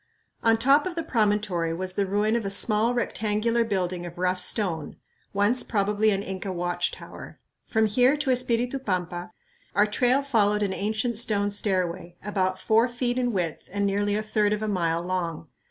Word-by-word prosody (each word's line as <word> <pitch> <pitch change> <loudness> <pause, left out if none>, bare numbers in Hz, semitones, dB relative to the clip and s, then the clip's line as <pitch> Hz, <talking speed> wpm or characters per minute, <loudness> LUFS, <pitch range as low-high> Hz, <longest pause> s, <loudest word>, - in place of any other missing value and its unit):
On 225 0 +4
top 275 +7 +4
of 360 - -5
the 330 - -2
promontory 205 - 0
was 185 +1 -3
the 200 0 0
ruin 210 +3 +1
of 235 - 0
a 195 - -2
small, 215 +4 +2
rectangular 230 0 0
building 185 -5 -2
of 175 0 -8
rough 180 0 0
stone, 175 -8 -1 0.4
once 205 +5 +2
probably 210 0 +1
an 200 -1 0
Inca 190 0 -4
watch 175 0 -1
tower. - - -11 0.3
From 220 -1 +2
here 250 +7 +3
to 290 -3 0
Espiritu 250 +1 +1
Pampa 180 -6 -3 0.4
our 205 +2 +5
trail 250 +6 +2
followed 210 -6 +2
an 195 -2 -1
ancient 220 +4 -1
stone 205 -3 +1
stairway, 180 -4 -1
about 185 -3 0
four 225 +5 +2
feet 245 +1 -1
in 245 -1 0
width 175 -6 -3
and 200 +1 0
nearly 205 +1 +1
a 215 - -1
third 210 -1 +1
of 210 0 -2
a - - -1
mile 170 -4 0
long. 170 -4 -3
205 Hz, 180 wpm, -26 LUFS, 185-230 Hz, 0.4 s, our